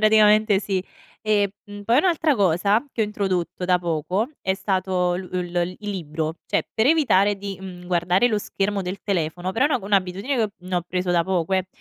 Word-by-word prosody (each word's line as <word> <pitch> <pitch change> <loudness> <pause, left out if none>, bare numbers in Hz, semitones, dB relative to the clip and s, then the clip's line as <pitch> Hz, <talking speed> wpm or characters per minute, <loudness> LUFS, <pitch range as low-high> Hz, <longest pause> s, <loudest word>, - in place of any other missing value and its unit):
praticamente 215 -1 +5
sì. 190 -3 -2 0.4
E, 205 -2 +2
mhmm, 205 0 -9
poi 235 +5 +4
un'altra 320 -3 +2
cosa, 200 - +2
che - - -3
ho 220 - +4
introdotto 185 -4 -2
da 180 0 +3
poco, 175 - -1
è 190 0 +1
stato 185 -2 0
l 180 0 -5
l 180 0 -2
il 210 -1 -4
libro, 160 -4 -3
cioè - - 0
per 220 +3 +2
evitare 205 -11 +4
di, 195 0 -6
mhmm, 180 -2 -9
guardare 180 +4 +2
lo 220 -3 +1
schermo 200 -1 -2
del 185 +2 -5
telefono 175 -1 -2
però 240 +6 +2
è - - 0
un'ago 245 -9 -1
un'abitudine 195 +6 0
che 220 -3 +1 0.2
no 180 -2 -1
preso 180 +1 -2
da 170 -1 +3
poco, 185 0 -1
eh; 185 -1 0
190 Hz, 195 wpm, -23 LUFS, 180-210 Hz, 0.4 s, praticamente